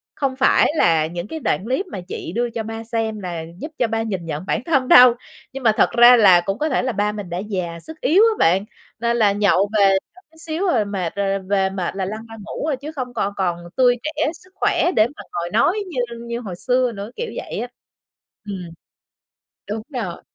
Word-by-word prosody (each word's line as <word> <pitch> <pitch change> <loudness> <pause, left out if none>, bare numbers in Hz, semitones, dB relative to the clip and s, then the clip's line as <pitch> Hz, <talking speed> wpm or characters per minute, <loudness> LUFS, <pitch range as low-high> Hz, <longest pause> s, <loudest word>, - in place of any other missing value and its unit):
"Không 270 -2 -1
phải 265 +2 +4
là 165 - +3
những 175 +3 -6
cái 320 - -6
đoạn 195 - -1
clip 260 - -1
mà 190 - -6
chị 165 - -6
đưa 240 +1 0
cho 230 -1 -4
ba 225 +1 -6
xem 225 -2 -2
là 175 -4 -5
giúp 300 - -7
cho 240 - +1
ba 225 +1 -1
nhìn 195 -6 -3
nhận 155 +1 -5
bản - - -1
thân 270 -6 +1
đâu." 250 -1 +9 0.4
Nhưng 270 0 -7
mà 225 - +5
thật - - +4
ra 240 +1 +8
là 185 -6 +7
cũng 195 +3 -3
có 310 +5 -1
thể 260 - 0
là 255 - 0
ba 205 -1 0
mình 205 -4 -7
đã 175 - -3
già, 185 -4 -4
sức 320 - -12
yếu 355 +10 +5
á 450 -1 +4
bạn, 185 +4 +3 0.3
nên 235 +1 0
là 210 -3 +4
nhậu 200 -1 +2
về 195 -1 +5 0.2
có 370 - -17
chút 320 - -22
xíu 330 +4 -2
rồi 235 - +2
mệt, 190 -4 -3
rồi 195 0 0
về 190 0 0
mệt 190 -2 -4
là 195 -1 -2
lăn 215 +4 -6
ra 225 - -9
ngủ 215 - -5
à, 305 -3 0
chứ 285 +4 -8
không 255 -5 -5
còn 200 -3 -1
còn 175 -3 0 0.2
tươi 245 -1 +4
trẻ 305 0 -1
sức 370 +3 -16
khỏe 355 - +1
để 215 - +5
mà - - -8
ngồi 175 0 -3
nói 370 - +3
như 285 -8 -4 0.3
như 235 0 -3
hồi 200 -7 -6
xưa 250 +5 +1
nữa, 205 +1 -7
kiểu 475 0 -4
vậy - - -5
á. 245 - -3 0.8
Ừm. 190 -4 -6 1.0
Đúng 215 +1 -3 0.2
rồi. 175 -3 -6
220 Hz, 235 wpm, -21 LUFS, 195-255 Hz, 1.0 s, đâu